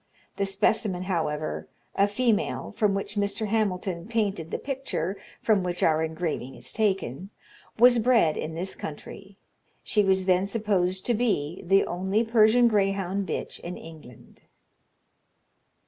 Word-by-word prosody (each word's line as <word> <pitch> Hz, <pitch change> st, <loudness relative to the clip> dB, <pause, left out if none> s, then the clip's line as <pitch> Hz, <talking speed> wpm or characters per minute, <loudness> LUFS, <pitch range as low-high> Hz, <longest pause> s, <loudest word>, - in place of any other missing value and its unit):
The 200 Hz, -, 0 dB
specimen, 195 Hz, -1 st, 0 dB
however, 150 Hz, -, -2 dB, 0.3 s
(a 200 Hz, -, +3 dB
female), 220 Hz, 0 st, 0 dB
from 210 Hz, -4 st, +2 dB
which 195 Hz, +1 st, -3 dB
Mr. 205 Hz, +2 st, 0 dB
Hamilton 190 Hz, -4 st, -1 dB
painted 205 Hz, -8 st, -1 dB
the -, -, -2 dB
picture 265 Hz, -, -3 dB, 0.3 s
from 215 Hz, -3 st, +3 dB
which 180 Hz, -1 st, -2 dB
our 160 Hz, -1 st, +3 dB
engraving 160 Hz, -5 st, -3 dB
is -, -, -8 dB
taken, 195 Hz, -, -1 dB, 0.5 s
was 240 Hz, +1 st, +6 dB
bred 225 Hz, -9 st, +3 dB
in 160 Hz, +1 st, -4 dB
this 185 Hz, +3 st, -4 dB
country. 195 Hz, +6 st, -9 dB, 0.5 s
She 210 Hz, -, +2 dB
was 190 Hz, -1 st, +2 dB
then 185 Hz, +1 st, +3 dB
supposed 195 Hz, -4 st, 0 dB
to 240 Hz, -, +2 dB
be 190 Hz, -9 st, -1 dB
the 195 Hz, +3 st, +4 dB
only 190 Hz, +5 st, 0 dB
Persian 225 Hz, +1 st, +5 dB
greyhound 195 Hz, -2 st, 0 dB
bitch -, -, -4 dB
in 175 Hz, +1 st, -7 dB
England." 155 Hz, -7 st, -13 dB
195 Hz, 135 wpm, -26 LUFS, 175-215 Hz, 0.5 s, was